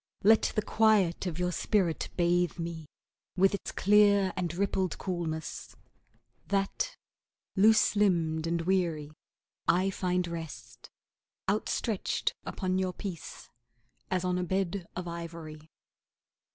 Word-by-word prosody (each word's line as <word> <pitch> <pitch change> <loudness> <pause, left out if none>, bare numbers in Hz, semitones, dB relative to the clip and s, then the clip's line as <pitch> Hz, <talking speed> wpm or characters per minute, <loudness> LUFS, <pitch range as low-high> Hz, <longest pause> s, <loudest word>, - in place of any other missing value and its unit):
Let 220 +2 +5
the 215 - +1
quiet 210 -5 +3
of 165 -3 -3
your 180 0 0
spirit 180 -3 0
bathe 175 -1 +2
me 165 -2 -5 0.5
With 195 +2 +4
its 200 - -4
clear 200 -1 +4
and 175 -3 -2
rippled 190 -1 -1
coolness, 165 -4 -4 0.7
That, 200 - -1 0.6
loose 215 +2 +5
limbed 165 -6 +2
and 170 0 0
weary, 170 -5 0 0.6
I 185 +3 +3
find 180 -1 0
rest, 165 -2 -8 0.6
Outstretched 210 +1 0
upon 185 -1 -1
your 185 -1 -1
peace, 180 -4 -7 0.6
as 185 -1 0
on 180 0 +1
a - - -1
bed 190 0 -1
of 180 -1 -4
ivory. 165 -2 -7
180 Hz, 115 wpm, -30 LUFS, 170-195 Hz, 0.7 s, Let